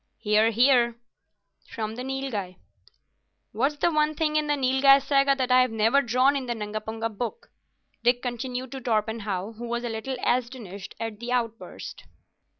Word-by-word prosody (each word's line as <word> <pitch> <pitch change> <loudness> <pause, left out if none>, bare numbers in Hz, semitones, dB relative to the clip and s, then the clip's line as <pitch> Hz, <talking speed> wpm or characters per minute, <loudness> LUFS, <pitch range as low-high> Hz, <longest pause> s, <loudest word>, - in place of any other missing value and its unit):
"Hear, 215 +1 +3
hear," 240 0 +4 0.7
from 220 -2 -4
the 245 - -6
Nilghai. 260 -9 -4 1.0
"What's 270 +8 0
the 340 +4 +1
one 305 0 +1
thing 305 0 0
in 305 0 +1
the 295 - +2
Nilghai 270 0 +5
Saga 275 0 +3
that 260 -2 -1
I've 255 0 +5
never 225 +5 +3
drawn 255 +2 +3
in 265 -2 -3
the 240 - -1
Nungapunga 220 +1 -4
Book?" 355 - -5 0.5
Dick 245 +1 +3
continued 250 +1 -4
to 270 -1 -6
Torpenhow, 215 -4 -1
who 240 +1 -6
was 240 +1 -2
a 240 - -2
little 225 +4 -4
astonished 235 -6 -2
at 225 -2 -5
the 240 +1 -5
outburst. 230 -3 -4
245 Hz, 155 wpm, -26 LUFS, 220-270 Hz, 1.0 s, Nilghai